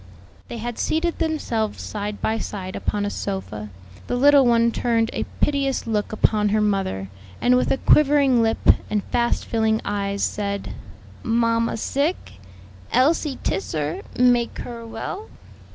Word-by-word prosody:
They 235 - -6
had 235 +1 -5
seated 335 +2 0
themselves 245 -9 -1
side 205 0 -5
by 225 +1 0
side 185 -3 -5
upon 205 -1 -2
a 205 - -2
sofa. 105 - -5 0.4
The - - -1
little 280 +1 +6
one 235 0 +4
turned 230 -1 0
a - - -2 0.2
piteous 280 -2 +1
look 215 -3 -1
upon 215 -1 +2
her 215 +1 +2
mother, 195 - -1 0.3
and 250 +1 +4
with 250 - +2
a - - +2
quivering 280 -5 +4
lip 225 0 +1 0.3
and 210 -2 0
fast 235 0 +1
filling 220 -1 +1
eyes, 200 -1 -2
said, 200 -1 -2 0.5
"Mamma 230 0 +1
sick? 280 - -2 0.5
Elsie 285 +1 +2
tiss 190 - -2
her, 155 0 -2 0.2
make 245 -1 +3
her 235 -1 -8
well?" 230 - -6
230 Hz, 145 wpm, -23 LUFS, 205-250 Hz, 0.5 s, little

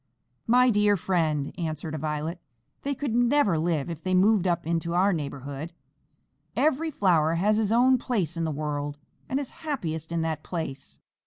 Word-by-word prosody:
"My 250 +2 +5
dear 210 -1 +3
friend," 160 -6 0
answered 155 -1 -3
a 155 - -3
Violet, 155 +3 -3 0.4
"they 280 0 -2
could 270 -3 -3
never 240 - +3
live 160 -4 0
if 165 -2 -6
they 185 +1 0
moved 195 0 +4
up 170 -1 0
into 170 +1 -1
our 190 +3 +4
neighborhood. 140 +1 -5 0.8
Every 315 +2 +2
flower 170 - +2
has 210 +5 +2
his 215 -1 +1
own 250 +2 +5
place 195 - -1
in 165 0 -1
this 160 - -2
world, 145 -1 -3 0.3
and 265 - 0
is 280 - -5
happiest 165 - -3
in 170 -1 0
that 160 -2 -2
place. 160 -7 -6
170 Hz, 170 wpm, -26 LUFS, 155-220 Hz, 0.8 s, My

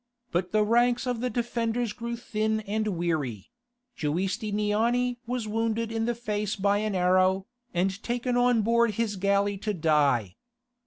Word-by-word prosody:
But 180 +1 -1
the 215 0 +3
ranks 240 +3 +3
of 250 -2 -1
the 250 - 0
defenders 235 -2 -1
grew 235 +1 -4
thin 220 -2 -1
and 215 +1 -2
weary; 150 - -2 0.4
Giustiniani 210 +8 0
was 245 -2 -2
wounded 225 +1 -1
in 225 0 -1
the 240 0 0
face 210 -3 -2
by 200 0 +2
an 215 -2 -1
arrow, 185 +1 +3 0.3
and 190 +3 -1
taken 245 +1 -1
on 245 -2 +3
board 235 -1 +2
his 225 -2 -1
galley 200 +1 +1
to 210 0 -2
die. 145 - +2
215 Hz, 150 wpm, -27 LUFS, 190-235 Hz, 0.4 s, the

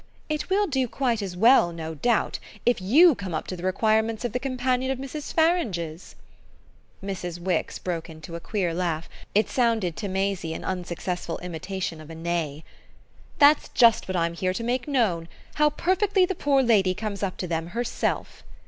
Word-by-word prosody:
"It 305 +3 -2
will 405 +2 +3
do 265 -7 0
quite 240 -3 0
as 185 -3 -5
well, 225 -3 +6
no 160 -1 -6
doubt, 235 +10 0 0.3
if 240 -5 +2
you 300 - +6
come 190 -6 -5
up 155 - -3
to 185 - -5
the 175 - -9
requirements 220 +4 +1
of 240 - -3
the 250 - 0
companion 255 -1 -1
of 265 - 0
Mrs. 275 +3 -6
Farange's!" 205 - 0 0.9
Mrs. 180 -3 -4
Wix 175 -1 -1
broke 170 -2 -4
into 160 +1 -9
a - - -4
queer 180 -2 -1
laugh; 165 -2 -2 0.3
it 210 - +4
sounded 225 -9 +1
to 205 - -3
Maisie 190 -4 -1
an - - -7
unsuccessful 180 -1 -3
imitation 180 -1 -4
of 155 - -12
a 165 - -8
neigh. 160 -3 -3 0.7
"That's 290 0 +5
just 230 -3 +4
what 185 -1 -1
I'm 170 0 0
here 185 +2 -1
to 230 - -4
make 245 +3 -1
known 210 - +1 0.3
how 300 0 +4
perfectly 375 +5 +2
the 380 - -2
poor 280 -5 +2
lady 195 -6 +3
comes 210 -1 -4
up 195 -2 -2
to - - -3
them 165 -1 -2
herself." 235 +6 -2
195 Hz, 180 wpm, -25 LUFS, 170-255 Hz, 0.9 s, well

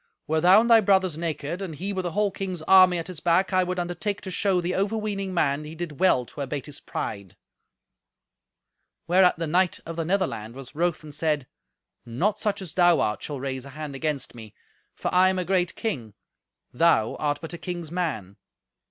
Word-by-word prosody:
Were 160 +1 0
thou 185 +5 +7
and 235 - 0
thy 230 -2 +7
brothers 190 -4 +2
naked, 165 +1 -3
and 180 -5 -5
he 190 +7 -4
with 185 -2 -2
a 170 - -5
whole 210 -1 +1
king's 185 -4 -5
army 185 0 +6
at 165 - -4
his 180 -4 -7
back, 180 +4 +2
I 185 0 +4
would 180 0 -3
undertake 175 +3 -2
to 190 - -6
show 190 +1 +2
the 175 +1 -2
overweening 200 -1 -1
man 150 -4 +1
he 155 +1 -9
did 165 -3 -6
well 180 -10 +3
to 140 - -9
abate 140 0 -4
his 145 -2 -7
pride." 100 -4 -6 1.7
Whereat 180 0 +4
the 165 - -2
knight 180 +3 +1
of 165 0 -7
the 165 - 0
Netherland 160 - -2
was 135 -1 -10
wroth 170 0 -1
and 150 -1 -10
said, 150 -4 0 0.6
"Not 165 - -1
such 205 -2 -1
as 175 - -7
thou 175 -1 +4
art 105 - 0
shall 145 -3 -5
raise 130 -1 -4
a 140 - -10
hand 150 -2 -5
against 145 0 -2
me, 110 -3 -12 0.4
for - - -3
I 185 +1 +5
am 190 - -1
a 180 - -1
great 180 -1 0
king; 120 - -4 0.6
thou 120 -6 +3
art 145 -1 0
but 165 0 -7
a 170 - -7
king's 175 -4 -5
man. 115 - -3
170 Hz, 205 wpm, -25 LUFS, 150-185 Hz, 1.7 s, thou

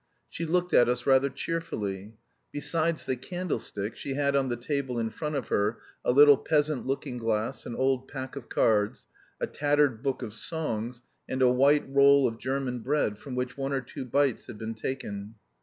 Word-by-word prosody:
She 165 - -4
looked 180 +2 0
at 120 - +6
us 125 0 -1
rather 135 0 +4
cheerfully. 110 - -4 0.4
Besides 160 +2 0
the 130 - 0
candlestick, 125 - -4
she 135 - -4
had 140 0 +1
on 135 -1 +2
the 120 - 0
table 130 0 -2
in 115 -1 -1
front 150 +3 -4
of 135 -5 -3
her 105 +3 +1 0.3
a - - +3
little 145 +2 +8
peasant 150 -3 0
looking 130 -2 -3
glass, 110 -1 -2
an 120 - -5
old 130 0 +1
pack 130 -1 -6
of 140 -4 -8
cards, 105 -2 +1 0.3
a - - 0
tattered 145 -5 +1
book 135 -1 -2
of 110 -3 -6
songs, 120 -3 -3 0.3
and 130 0 +1
a 125 - +6
white 140 +3 +4
roll 140 0 +6
of 115 -1 -5
German 130 -1 -2
bread 120 -4 0
from 135 -3 -7
which 125 +1 -3
one 135 +1 -1
or 135 - 0
two 125 - -7
bites 135 0 +1
had - - -8
been 110 +1 -4
taken. 110 -3 -5
130 Hz, 190 wpm, -28 LUFS, 115-145 Hz, 0.4 s, little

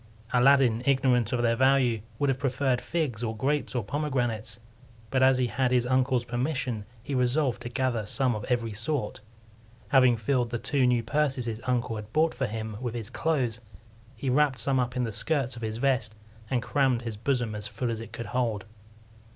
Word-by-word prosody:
Aladdin, 125 -2 +5
ignorant 130 -4 +3
of 120 -2 0
their 115 0 +3
value, 130 -3 +3 0.2
would 145 - +1
have 130 -1 0
preferred 130 -2 0
figs, 150 -10 -2
or 110 -1 -3
grapes, 140 +3 -1
or 120 - 0
pomegranates; 120 -5 -2 0.5
but 130 - +2
as 130 0 +5
he 130 - +2
had 125 +1 0
his 125 -1 +2
uncle's 130 -1 +1
permission, 120 -3 -2 0.2
he 140 - -5
resolved 125 -1 +1
to 120 - -5
gather 120 -4 -1
some 130 +1 +1
of 105 -2 -4
every 115 -3 -1
sort. 125 -2 -3 0.7
Having 130 -3 +5
filled 120 +2 0
the 120 - -2
two 130 +2 +1
new 120 -2 +2
purses 135 0 0
his 115 -1 -4
uncle 125 -2 0
had 105 0 -8
bought 160 +1 +3
for - - -2
him 110 0 -5
with 120 -2 -3
his 115 -3 -6
clothes, 125 -8 0 0.5
he 120 +5 -6
wrapped 135 0 +3
some 130 +3 +1
up 125 0 -1
in 125 - 0
the 115 - -2
skirts 130 +3 -1
of 120 - -9
his 110 -1 -3
vest, 125 -4 0 0.3
and 125 -2 0
crammed 125 0 +1
his 115 -2 -4
bosom 120 0 -1
as 105 0 -5
full 115 +3 -3
as 115 - -3
it 115 -1 -9
could 120 0 -6
hold. 115 -6 -1
125 Hz, 195 wpm, -27 LUFS, 115-135 Hz, 0.7 s, Aladdin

